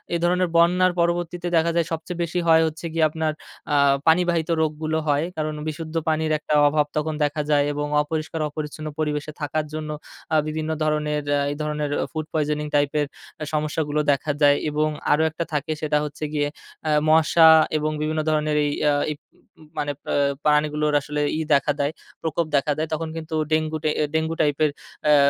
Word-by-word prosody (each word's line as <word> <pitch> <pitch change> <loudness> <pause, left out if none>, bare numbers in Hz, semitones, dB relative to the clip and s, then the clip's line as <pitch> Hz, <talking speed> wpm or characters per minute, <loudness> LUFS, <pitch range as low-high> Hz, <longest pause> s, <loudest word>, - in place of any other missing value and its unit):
এ - - +3
ধরনের 180 +1 +2
বন্যার 180 +2 +4
পরবর্তীতে 175 +1 0
দেখা 165 +1 +2
যায় 170 -1 +2
সবচেয়ে 165 +2 -4
বেশি 175 +2 -2
হয় 160 0 +6
হচ্ছে 160 +2 -6
গিয়ে, 165 -1 +2
আপনার 160 0 -1 0.4
আ - - +3 0.3
পানিবাহিত 170 -1 +3
রোগগুলো 155 0 -1
হয়। 145 0 +2
কারণ 155 0 -2
বিশুদ্ধ 160 +1 -5
পানির 155 0 0
একটা 150 - -3 0.2
অভাব 150 0 +2
তখন 155 +1 -1
দেখা 145 +1 0
যায় 145 -1 +4
এবং 145 0 -2
অপরিষ্কার 155 +1 -3
অপরিচ্ছন্ন 155 +1 -6
পরিবেশে 150 -1 -2
থাকার 150 +1 -1
জন্য, 155 -1 -4 0.4
আ - - +4
বিভিন্ন 155 0 -3
ধরনের 150 -1 0 0.3
এই - - -4
ধরনের 150 -1 -2 0.2
ফুড 155 -2 -3
পয়জনিং 150 -1 0
টাইপের 145 +1 +2 0.5
সমস্যা 155 +1 0
গুলো 150 +1 +1
দেখা 140 +2 0
যায় 145 -1 +6
এবং 150 +1 +1 0.2
আরো 150 +2 +4
একটা 160 +2 -4
থাকে, 150 +1 -1
সেটা 150 -1 +1
হচ্ছে 150 +1 -7
গিয়ে 145 -1 +1 0.4
আ - - +2 0.2
মশা 160 +1 +6 0.3
এবং 155 0 -1
বিভিন্ন 155 +1 0
ধরনের 155 -1 +1
এই 145 - 0 0.2
আ - - +4 0.3
প - - -87
প 190 - -31 0.2
মানে 145 0 -1
পা - - -3 0.3
পানি 150 0 +4
গুলোর 150 0 0
আসলে 150 +1 -3 0.2
ই - - 0
দেখা 140 +1 +3
দেয়, 140 +1 +1 0.3
প্রকোপ 165 +1 -1
দেখা 140 +1 +2
দেয়। 155 +1 -1
তখন 160 +1 -2
কিন্তু 160 0 -5 0.2
ডেঙ্গু 155 0 +1
আ - - +2 0.2
ডেঙ্গু 160 +1 0
টাইপের 150 0 +2 0.4
অ্যা 150 0 +6
155 Hz, 180 wpm, -23 LUFS, 150-160 Hz, 0.5 s, হয়